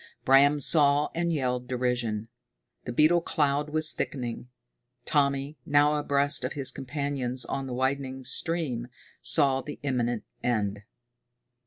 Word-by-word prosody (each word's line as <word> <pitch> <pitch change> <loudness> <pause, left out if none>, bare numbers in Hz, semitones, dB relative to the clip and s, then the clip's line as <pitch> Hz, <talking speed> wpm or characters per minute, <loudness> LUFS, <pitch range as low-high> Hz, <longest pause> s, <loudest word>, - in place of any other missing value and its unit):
Bram 140 +2 +5
saw 145 0 +4
and 170 0 -1
yelled 125 -5 -1
derision. 120 -4 -1 0.6
The 120 - -4
beetle 155 +7 +4
cloud 145 -2 0
was 155 +1 +1
thickening. 125 -2 -4 0.6
Tommy, 140 0 0
now 145 +2 +3
abreast 145 -2 +1
of 130 - -2
his 140 -3 +1
companions 135 -2 -3
on 135 -1 -4
the 125 - -5
widening 130 0 -2
stream, 135 -5 -1 0.3
saw 135 -4 +3
the 145 +2 -8
imminent 120 -5 -1 0.2
end. 105 -4 -1
135 Hz, 125 wpm, -27 LUFS, 125-145 Hz, 0.6 s, Bram